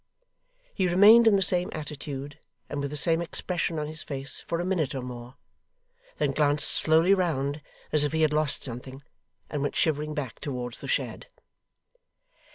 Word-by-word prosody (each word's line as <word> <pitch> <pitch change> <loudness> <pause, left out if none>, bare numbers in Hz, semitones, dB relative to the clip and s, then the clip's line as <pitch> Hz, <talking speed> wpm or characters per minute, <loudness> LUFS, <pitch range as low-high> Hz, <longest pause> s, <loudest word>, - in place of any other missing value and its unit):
He 190 -3 0
remained 210 +6 +7
in 215 - +6
the 195 - +2
same 180 -1 +2
attitude 145 -2 -7 0.3
and 145 - -4
with 140 - -3
the 150 - -3
same 165 +4 +3
expression 170 -1 -3
on 150 - -2
his 155 +1 -3
face 135 -1 -5
for 170 - -2
a 175 - -2
minute 170 -8 -1
or 130 - -4
more; 125 0 -9 0.8
then - - 0
glanced 145 -1 +5
slowly 160 +4 +3
round 150 -6 -1 0.3
as 150 -1 +2
if 145 - -1
he 160 0 +1
had 155 -1 +2
lost 150 -1 +1
something; 130 +2 -7 0.4
and 145 - -4
went 145 - -2
shivering 150 -1 0
back, 135 -6 -5
towards 125 -4 -6
the - - -7
shed. - - -3
150 Hz, 170 wpm, -26 LUFS, 140-170 Hz, 0.8 s, remained